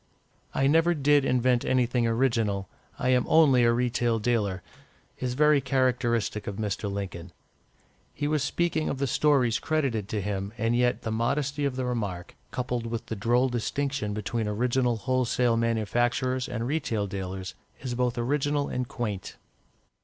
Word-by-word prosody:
"I 135 - +2
never 165 +4 +4
did 145 -1 +3
invent 125 -1 +2
anything 125 -2 +1
original 115 -5 +1 0.3
I 130 - 0
am 125 -1 +4
only 145 -6 +5
a 115 - +5
retail 120 -1 +1
dealer," 105 -5 0 0.6
is 125 -1 -2
very 150 0 +4
characteristic 120 -5 0
of 100 - -3
Mr. 105 -1 -3
Lincoln. 95 -3 -5 0.8
He 145 - -3
was 150 -1 +1
speaking 165 +1 0
of - - -2
the 140 - 0
stories 130 -3 +2
credited 130 -10 -1
to 110 - -1
him, 100 +1 -3
and 115 0 +1
yet 125 0 +1
the 115 - -2
modesty 140 +5 0
of 135 -2 -1
the 130 -1 -2
remark, 100 -8 -3
coupled 125 -2 -3
with 115 0 -4
the 110 - -4
droll 120 +5 +2
distinction 120 -2 -2
between 110 +1 -2
original 120 +3 +1
wholesale 125 0 +1
manufacturers 120 +3 0
and 115 -2 -3
retail 120 -7 -1
dealers, 95 -1 -5 0.3
is 125 -1 -4
both 125 0 0
original 145 +3 0
and 125 -1 -2
quaint. 105 -7 -4
120 Hz, 155 wpm, -27 LUFS, 110-130 Hz, 0.8 s, only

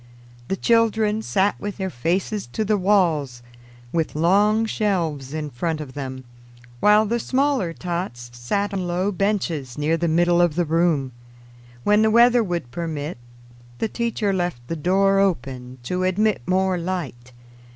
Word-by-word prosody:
The - - -1
children 220 -1 +2
sat 200 -2 +1
with 205 -1 -5
their 190 -2 -3
faces 180 - -2
to 220 - -1
the 210 +1 +2
walls, 170 -11 +1 0.5
with 165 -3 -1
long 205 +7 +3
shelves 170 -11 -1
in 150 -1 -4
front 160 +6 -2
of 145 -4 -7
them, 130 -2 -6 0.6
while 210 - +5
the 235 +3 -1
smaller 260 -7 0
tots 170 -9 -5
sat 200 +13 -2
on 185 -2 -2
low 180 +3 0
benches 175 - -2
near 155 +3 +1
the 170 +1 0
middle 175 +2 +3
of 175 -4 +2
the 175 0 +1
room. 160 -4 +1 0.7
When 210 +1 +4
the 220 - +4
weather 235 +1 +5
would 170 - -4
permit, 155 -2 -4 0.6
the 225 - -1
teacher 230 -3 -1
left 175 -10 -3
the 165 - -3
door 195 +5 +2
open 130 -10 -1
to 180 +8 -2
admit 195 - +1
more 185 0 +1
light. 155 -9 -5
180 Hz, 150 wpm, -22 LUFS, 150-205 Hz, 0.7 s, while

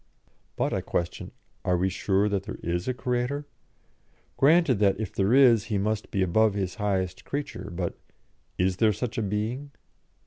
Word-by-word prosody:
But, - - 0
I - - 0
questioned, 85 0 -3 0.3
are 90 -1 +2
we 90 +2 +1
sure 95 +2 +1
that 100 -2 -1
there 105 - -6
is 85 +1 -2
a 130 - +1
Creator? 125 +4 -1 0.9
Granted 150 - +4
that, 100 -1 +3
if 110 -4 -4
there 95 +2 +1
is, 125 -6 +6
He 105 - -1
must 105 +2 -1
be 95 -2 0
above 105 +3 +3
His 95 -3 -2
highest 95 -3 -1
creature, 140 -9 -5
but 85 0 -4 0.6
is 90 0 +1
there 110 0 +4
such 115 +2 -3
a - - 0
being? 110 +7 -2
105 Hz, 170 wpm, -27 LUFS, 95-120 Hz, 0.9 s, is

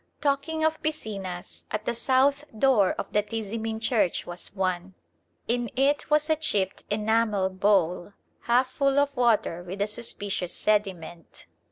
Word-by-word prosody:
Talking 290 +2 0
of 315 0 +1
piscinas, 200 - -4
at 215 0 -3
the 240 - 0
south 270 +4 +2
door 215 -6 +4
of - - -6
the 210 - +4
Tizimin 220 +1 -4
church 225 -5 +1
was 175 +3 -7
one. 185 -1 -2 0.5
In 240 0 0
it 280 +2 +1
was 300 0 +3
a 315 - +3
chipped 205 -11 -1
enamel 210 -2 +1
bowl, 185 -1 +1 0.3
half 250 +2 +3
full 275 +1 +1
of 285 0 +2
water 220 -8 +2
with 180 +3 -7
a 200 - +2
suspicious 205 -4 -3
sediment. 185 -6 -2
220 Hz, 145 wpm, -26 LUFS, 190-270 Hz, 0.5 s, door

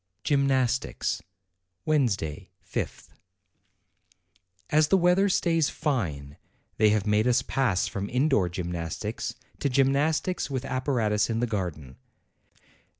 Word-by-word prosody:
GYMNASTICS 135 -3 +1 0.6
Wednesday, 110 - 0 0.2
5th. - - -4 1.6
As 155 0 +4
the 195 - +4
weather 180 +3 +3
stays 165 -4 +2
fine, 75 - -3 0.4
they 110 0 +5
have 105 -2 +1
made 105 +2 +2
us 125 0 +3
pass 120 -10 +1
from 100 0 -4
indoor 125 - +2
gymnastics 85 -2 -4 0.2
to 140 - 0
gymnastics 140 +7 +1
with 135 -1 -3
ap 130 -1 -3
paratus 110 -6 +1
in 115 0 0
the 120 - +2
garden. 85 - -4
125 Hz, 110 wpm, -27 LUFS, 100-140 Hz, 1.6 s, they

